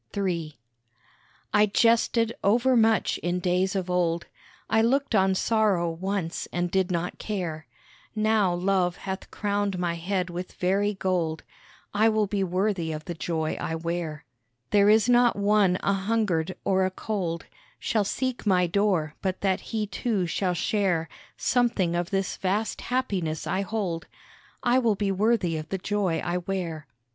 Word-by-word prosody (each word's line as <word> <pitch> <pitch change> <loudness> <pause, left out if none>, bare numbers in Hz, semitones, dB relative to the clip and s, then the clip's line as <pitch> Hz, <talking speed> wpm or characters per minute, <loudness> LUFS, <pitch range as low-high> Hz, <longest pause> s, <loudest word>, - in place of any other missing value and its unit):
III 170 -6 -2 1.0
I 210 0 +5
jested 230 +1 +3
over 245 +6 +3
much 225 -1 +3
in 175 +1 -1
days 180 +2 +1
of 190 -2 -1
old, 170 -2 0 0.4
I 220 - +3
looked 270 +3 +1
on 190 -2 +3
sorrow 200 -5 +2
once 180 0 -3
and 175 0 -1
did 190 0 +1
not 175 0 -2
care, 170 -7 -4 0.5
Now 215 -3 +2
Love 180 0 +1
hath 190 0 -5
crowned 205 -2 -1
my 175 -1 -1
head 180 +1 -2
with 180 +1 -6
very 200 +3 +1
gold, 175 -4 -1 0.5
I 215 +2 +4
will 215 -1 +2
be 200 0 -1
worthy 185 -2 0
of 155 0 -6
the 175 - -4
joy 160 -1 -2
I 160 - -2
wear. 165 -2 -4 0.5
There 205 0 +5
is 220 +2 +5
not 245 -1 +5
one 200 -2 +3
a 200 - +2
hungered 190 -4 0
or 190 -1 +3
a 185 - +2
cold 185 -4 -3 0.3
Shall 215 -2 0
seek 255 +5 -2
my 185 -3 +3
door 175 -4 +1
but 190 -1 -2
that 190 -2 +1
he 220 -2 -1
too 205 -2 -1
shall 180 +1 -1
share 180 -4 0 0.3
Something 235 -9 +1
of 175 0 -1
this 195 -1 -1
vast 205 +4 -1
happiness 195 -12 -2
I 190 - 0
hold; 195 -5 -3 0.6
I 245 +1 +4
will 230 -4 +2
be 200 0 0
worthy 195 -4 +1
of 155 0 -6
the 195 - -1
joy 190 -3 0
I 175 0 0
wear. 175 -4 -4
190 Hz, 155 wpm, -26 LUFS, 175-210 Hz, 1.0 s, I